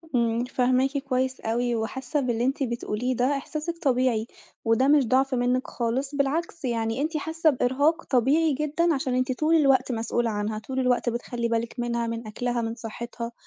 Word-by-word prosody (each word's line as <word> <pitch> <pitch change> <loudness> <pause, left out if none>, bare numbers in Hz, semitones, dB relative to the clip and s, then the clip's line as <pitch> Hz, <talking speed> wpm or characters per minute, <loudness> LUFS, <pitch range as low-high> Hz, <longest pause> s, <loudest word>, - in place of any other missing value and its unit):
امم، 235 0 +2
فاهماكِ 255 +2 +1
كويّس 260 -1 -1
أوي 240 +2 0
وحاسّة 265 +6 -2
باللي 240 -3 0
أنتِ 270 +2 0
بتقوليه 240 0 -2
ده 260 +4 +1
إحساسِك 305 +4 -4
طبيعي، 255 -7 +1 0.4
وده 225 +4 +3
مش 285 -3 +4
ضعف 265 +2 +2
منِك 250 +1 +1
خالص 260 +4 -2
بالعكس 305 +3 -1
يعني 230 0 -1
أنتِ 310 +2 -1
حاسّة 320 +1 +1
بإرهاق 285 +5 +1
طبيعي 285 +5 +2
جدًا 305 +4 +1
عشان 265 -3 -1
أنتِ 255 +1 +1
طول 310 +6 +2
الوقت 275 -4 +4
مسئولة 230 0 0
عنها، 215 0 -2
طول 260 +4 -4
الوقت 250 -1 +2
بتخلّي 235 0 -3
بالِك 230 0 -2
منها 235 -1 -1
من 230 0 -4
أكلها 240 +2 -2
من 225 0 -3
صحتها، 235 0 -6
255 Hz, 170 wpm, -26 LUFS, 235-280 Hz, 0.4 s, مش